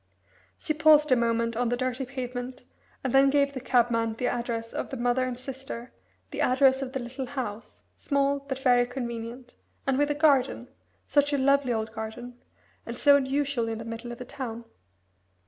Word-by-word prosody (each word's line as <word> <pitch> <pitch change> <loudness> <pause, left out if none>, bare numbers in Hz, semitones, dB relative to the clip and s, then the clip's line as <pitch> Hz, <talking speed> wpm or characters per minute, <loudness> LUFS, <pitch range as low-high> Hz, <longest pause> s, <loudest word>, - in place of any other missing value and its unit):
She 310 - -2
paused 300 -1 +5
a - - +7
moment 230 -1 0
on 240 0 0
the 245 - 0
dirty 255 +1 -2
pavement, 250 -1 -6 0.4
and 260 - -2
then 270 0 +6
gave 280 0 +2
the 260 - -4
cabman 230 -3 +2
the 250 - -3
address 235 -2 -2
of - - -3
the 265 - -5
mother 245 +1 +1
and 250 -1 -4
sister, 255 -2 -8 0.4
the - - -3
address 265 +1 +4
of 265 -1 -5
the 265 - -2
little 255 +2 -5
house 235 -5 -6
small, 280 0 0
but 275 -1 -5
very 245 -2 +3
convenient 240 0 -6 0.3
and 270 0 +1
with 290 0 +2
a 295 - 0
garden 275 -5 +2 0.4
such 290 0 +2
a - - +3
lovely 275 -1 +3
old 220 -1 -2
garden 230 +2 -7 0.4
and 235 +1 -7
so 285 +1 +6
unusual 275 -3 0
in 225 - -3
the 225 - -7
middle 230 +1 -6
of 240 - -8
a 250 - -6
town. 235 -3 -6
255 Hz, 185 wpm, -27 LUFS, 235-275 Hz, 0.4 s, a